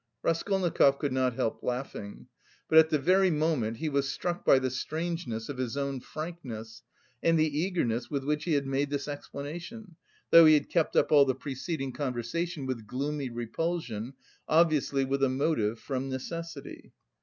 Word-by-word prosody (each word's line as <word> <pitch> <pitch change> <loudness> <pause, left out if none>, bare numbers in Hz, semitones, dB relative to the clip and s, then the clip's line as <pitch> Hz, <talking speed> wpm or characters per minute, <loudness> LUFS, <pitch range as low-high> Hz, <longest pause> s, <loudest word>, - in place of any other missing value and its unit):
Raskolnikov 165 -5 +2
could 140 -2 -2
not 130 -2 +1
help 115 - -1
laughing. 125 -5 -5 0.4
But 160 - +7
at 160 0 +5
the 155 - +2
very 185 +6 +4
moment, 150 -8 0
he 160 - -3
was 140 -2 0
struck 175 +3 -3
by - - +6
the 130 -1 0
strangeness 155 -4 -3
of 135 -3 -6
his 130 +1 -2
own 140 -1 -2
frankness, 125 -8 -7 0.4
and 165 0 +3
the 155 -2 +1
eagerness 155 -10 -1
with 140 -2 -2
which 150 +2 -1
he 170 - +1
had 140 -1 +1
made 135 +1 0
this 145 0 -3
explanation, 165 +7 -7 0.3
though 165 -1 +9
he 155 - +8
had 145 - 0
kept 165 -3 +1
up - - +3
all 145 -2 +7
the 130 -2 0
preceding 135 +1 -4
conversation 140 +5 -3
with 120 -5 -4
gloomy 140 +3 -3
repulsion, 120 0 -3 0.4
obviously 155 -4 +3
with 135 +1 -1
a 135 - +4
motive, 130 -5 0
from 135 -1 -3
necessity. 155 +3 -7
140 Hz, 165 wpm, -29 LUFS, 130-165 Hz, 0.4 s, though